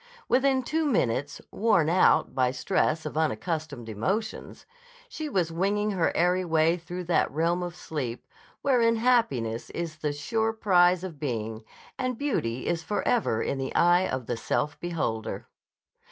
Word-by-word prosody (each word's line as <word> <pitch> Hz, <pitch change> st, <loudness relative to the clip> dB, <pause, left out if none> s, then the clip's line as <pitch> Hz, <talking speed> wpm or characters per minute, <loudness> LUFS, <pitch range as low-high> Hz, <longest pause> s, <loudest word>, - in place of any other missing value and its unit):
Within 265 Hz, 0 st, +3 dB
two 315 Hz, +4 st, 0 dB
minutes, 145 Hz, -, 0 dB
worn 205 Hz, -8 st, +2 dB
out 180 Hz, +3 st, +3 dB
by 130 Hz, -1 st, +2 dB
stress 155 Hz, +4 st, 0 dB
of 150 Hz, -, -5 dB
unaccustomed 155 Hz, -2 st, -2 dB
emotions, 190 Hz, -, -3 dB, 0.4 s
she 315 Hz, -11 st, -5 dB
was 180 Hz, -, 0 dB
winging 205 Hz, +5 st, 0 dB
her 180 Hz, -4 st, +1 dB
airy 180 Hz, +2 st, +2 dB
way 165 Hz, -1 st, +3 dB
through 180 Hz, +1 st, -6 dB
that 175 Hz, 0 st, +2 dB
realm 165 Hz, +4 st, 0 dB
of 175 Hz, -1 st, -5 dB
sleep 135 Hz, -9 st, -5 dB, 0.4 s
wherein 235 Hz, -4 st, +3 dB
happiness 180 Hz, -, +1 dB
is 165 Hz, -2 st, -5 dB
the 150 Hz, -1 st, -2 dB
sure 220 Hz, +10 st, -1 dB
prize 180 Hz, -4 st, +3 dB
of 170 Hz, -6 st, -7 dB
being, 115 Hz, -5 st, -3 dB, 0.4 s
and 255 Hz, -2 st, -1 dB
beauty 130 Hz, -, -2 dB
is 170 Hz, -1 st, 0 dB
forever 205 Hz, -, 0 dB
in 135 Hz, -, -2 dB
the 135 Hz, -, -4 dB
eye 175 Hz, +2 st, +4 dB
of 130 Hz, -2 st, -3 dB
the 120 Hz, -, -3 dB
self 145 Hz, +5 st, -2 dB
beholder. 150 Hz, -11 st, -3 dB
170 Hz, 150 wpm, -27 LUFS, 145-210 Hz, 0.4 s, eye